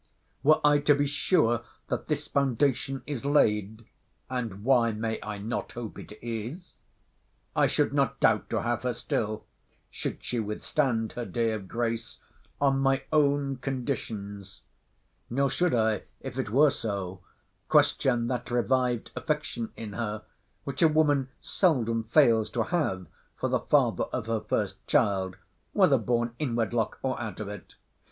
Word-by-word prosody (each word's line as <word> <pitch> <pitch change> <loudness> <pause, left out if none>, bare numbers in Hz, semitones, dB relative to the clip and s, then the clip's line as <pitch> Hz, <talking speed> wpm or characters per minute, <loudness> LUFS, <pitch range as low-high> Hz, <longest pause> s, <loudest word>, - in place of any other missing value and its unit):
Were 155 +4 +5
I 145 0 +6
to 145 0 +4
be 145 0 +1
sure 145 - +2 0.3
that - - -2
this - - -1
foundation 135 0 0
is 145 -5 -4
laid 110 -6 +2 0.5
[And 115 -6 -3
why 120 -3 +4
may 110 +1 -2
I 105 -1 -5
not 110 +4 -4
hope 120 -3 -6
it - - -10
is?] 120 - -5 0.8
I - - +4
should - - +1
not - - +1
doubt - - +3
to - - -1
have 120 -1 0
her 125 -1 -1
still 110 -2 -2 0.5
(should - - -5
she 120 - -2
withstand 115 +2 -1
her 120 - -4
day 115 -1 0
of 105 -3 -4
grace) 115 +1 -2 0.4
on 135 -1 +3
my 135 0 +2
own 140 -2 +2
conditions; 115 -7 -5 0.7
nor 135 +2 +1
should 175 0 +2
I, 110 -3 +1
if - - -6
it - - -2
were 140 +6 +5
so, 95 -6 -4 0.5
question 135 -5 +3
that 120 0 -3
revived 125 0 +1
affection 150 -7 -2
in 110 -3 -7
her, 110 0 -3 0.4
which 140 -1 -5
a 165 - +8
woman 145 -4 +2
seldom 115 - +1
fails 110 0 +4
to - - +3
have 145 - -1 0.3
for - - -1
the - - +2
father - - +2
of - - -4
her 115 -1 -1
first 100 -2 -1
child, 95 -8 +2 0.4
whether - - +5
born 120 -1 0
in 130 -6 -1
wedlock, 115 -1 0
or 130 -2 -1
out 110 -3 -5
of 110 - -4
it. 105 -2 -9
120 Hz, 155 wpm, -28 LUFS, 110-140 Hz, 0.8 s, a